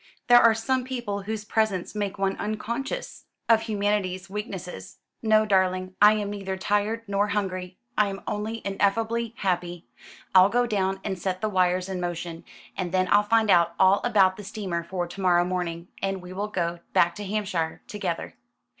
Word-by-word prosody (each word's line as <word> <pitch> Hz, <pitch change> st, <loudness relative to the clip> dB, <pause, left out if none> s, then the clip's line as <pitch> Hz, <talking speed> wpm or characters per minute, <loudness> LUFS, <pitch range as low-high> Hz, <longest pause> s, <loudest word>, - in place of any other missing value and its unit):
There 240 Hz, 0 st, +9 dB
are 230 Hz, -1 st, +6 dB
some 255 Hz, +3 st, 0 dB
people 240 Hz, -6 st, -4 dB
whose 215 Hz, +1 st, -5 dB
presence 210 Hz, -4 st, 0 dB
makes 205 Hz, -1 st, -3 dB
one 195 Hz, 0 st, 0 dB
unconscious 235 Hz, -, -4 dB, 0.2 s
of 225 Hz, -1 st, +5 dB
humanity's 205 Hz, -4 st, -1 dB
weaknesses. 190 Hz, -, -6 dB, 0.2 s
No, 215 Hz, -1 st, +4 dB
darling, 185 Hz, -2 st, +1 dB
I 210 Hz, +1 st, +8 dB
am 205 Hz, -1 st, -2 dB
neither 195 Hz, -2 st, -4 dB
tired 205 Hz, +4 st, 0 dB
nor 200 Hz, +1 st, +1 dB
hungry; 185 Hz, -3 st, -3 dB, 0.2 s
I 210 Hz, -, +3 dB
am 195 Hz, 0 st, -6 dB
only 215 Hz, +2 st, -3 dB
ineffably 225 Hz, +4 st, 0 dB
happy. 175 Hz, -4 st, -2 dB, 0.5 s
I'll 185 Hz, +1 st, +7 dB
go 245 Hz, +3 st, +2 dB
down 195 Hz, -4 st, -1 dB
and 190 Hz, -3 st, -3 dB
set 185 Hz, 0 st, -2 dB
the 215 Hz, -, 0 dB
wires 185 Hz, -1 st, +1 dB
in 185 Hz, -2 st, -4 dB
motion; 170 Hz, -1 st, -4 dB, 0.3 s
and 180 Hz, -2 st, -3 dB
then 185 Hz, 0 st, +1 dB
I'll 205 Hz, -, +6 dB
find 220 Hz, 0 st, +3 dB
out 170 Hz, -1 st, +4 dB
all 190 Hz, +2 st, +5 dB
about 195 Hz, -6 st, +3 dB
the 210 Hz, -, -8 dB
steamer 190 Hz, -4 st, -4 dB
for 175 Hz, +1 st, -3 dB
to 175 Hz, +3 st, -8 dB
morrow 175 Hz, -2 st, +4 dB
morning, 175 Hz, -2 st, -3 dB
and 195 Hz, -1 st, -1 dB
we 180 Hz, 0 st, -10 dB
will 200 Hz, +3 st, -2 dB
go 175 Hz, -4 st, -2 dB
back 170 Hz, 0 st, +4 dB
to 205 Hz, -, -5 dB
Hampshire 190 Hz, -5 st, -2 dB
together." 185 Hz, -5 st, -4 dB
195 Hz, 175 wpm, -26 LUFS, 185-215 Hz, 0.5 s, There